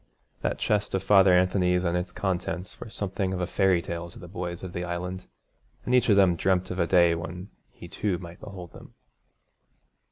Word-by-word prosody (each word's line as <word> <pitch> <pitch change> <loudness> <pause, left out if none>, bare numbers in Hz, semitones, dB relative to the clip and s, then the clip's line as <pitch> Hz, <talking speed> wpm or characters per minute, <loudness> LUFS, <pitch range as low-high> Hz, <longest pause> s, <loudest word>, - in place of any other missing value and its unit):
That - - -1
chest 105 -2 0
of 95 - -1
Father 95 -1 +6
Anthony's 90 -1 +2
and 85 -1 0
its 90 +1 -2
contents 90 -2 -3
were - - -8
something 95 -2 -2
of 90 - -3
a 90 - 0
fairy 95 -1 +2
tale 85 0 -5
to - - -14
the 90 - -10
boys 85 -1 -5
of 90 -2 -6
the 90 - -3
Island, 90 +1 -4 0.6
and 125 - -1
each 125 -2 +4
of 100 - +6
them 95 -3 +5
dreamt 95 +1 +1
of 90 - -4
a 85 - +2
day 85 -2 +5
when 90 +3 -6 0.2
he - - -12
too 100 -4 -1
might 85 0 -10
behold 90 -4 -9
them. - - -14
90 Hz, 200 wpm, -27 LUFS, 90-95 Hz, 0.6 s, Father